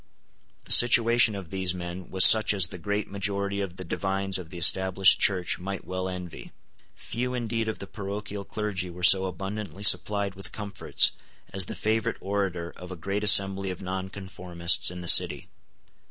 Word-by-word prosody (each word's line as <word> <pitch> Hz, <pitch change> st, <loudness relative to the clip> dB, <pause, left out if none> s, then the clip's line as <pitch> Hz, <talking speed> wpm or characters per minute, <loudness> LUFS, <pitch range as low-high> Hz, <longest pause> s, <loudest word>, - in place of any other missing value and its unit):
The -, -, -4 dB
situation 120 Hz, -2 st, +5 dB
of 95 Hz, -4 st, -9 dB
these 95 Hz, -2 st, -1 dB
men 90 Hz, +1 st, -8 dB
was 95 Hz, 0 st, +6 dB
such 110 Hz, -1 st, +5 dB
as 90 Hz, -4 st, +1 dB
the 90 Hz, -, -10 dB
great 100 Hz, +4 st, -3 dB
majority 100 Hz, 0 st, -3 dB
of 95 Hz, -3 st, -6 dB
the 95 Hz, -, -7 dB
divines 95 Hz, 0 st, -2 dB
of 85 Hz, -3 st, -11 dB
the 90 Hz, -, -10 dB
Established 95 Hz, +2 st, +4 dB
Church 90 Hz, -3 st, 0 dB
might 95 Hz, +2 st, -7 dB
well 95 Hz, 0 st, -5 dB
envy. 90 Hz, -3 st, -9 dB, 0.4 s
Few 125 Hz, +2 st, -5 dB
indeed 115 Hz, -2 st, -3 dB
of 110 Hz, -, -4 dB
the -, -, -8 dB
parochial 100 Hz, 0 st, -7 dB
clergy 100 Hz, -3 st, -5 dB
were 90 Hz, +1 st, -11 dB
so 95 Hz, +1 st, +5 dB
abundantly 100 Hz, +2 st, -7 dB
supplied 100 Hz, -1 st, +4 dB
with 95 Hz, 0 st, -11 dB
comforts 105 Hz, -2 st, -1 dB, 0.4 s
as 95 Hz, -1 st, -1 dB
the -, -, -8 dB
favourite 110 Hz, +1 st, -2 dB
orator 95 Hz, -4 st, -4 dB
of 90 Hz, 0 st, -11 dB
a -, -, -7 dB
great 100 Hz, +5 st, -5 dB
assembly 100 Hz, -1 st, +4 dB
of 90 Hz, -, -7 dB
nonconformists 95 Hz, -2 st, -1 dB
in 90 Hz, 0 st, -9 dB
the 85 Hz, -, -8 dB
City. -, -, +3 dB
95 Hz, 170 wpm, -25 LUFS, 90-100 Hz, 0.4 s, was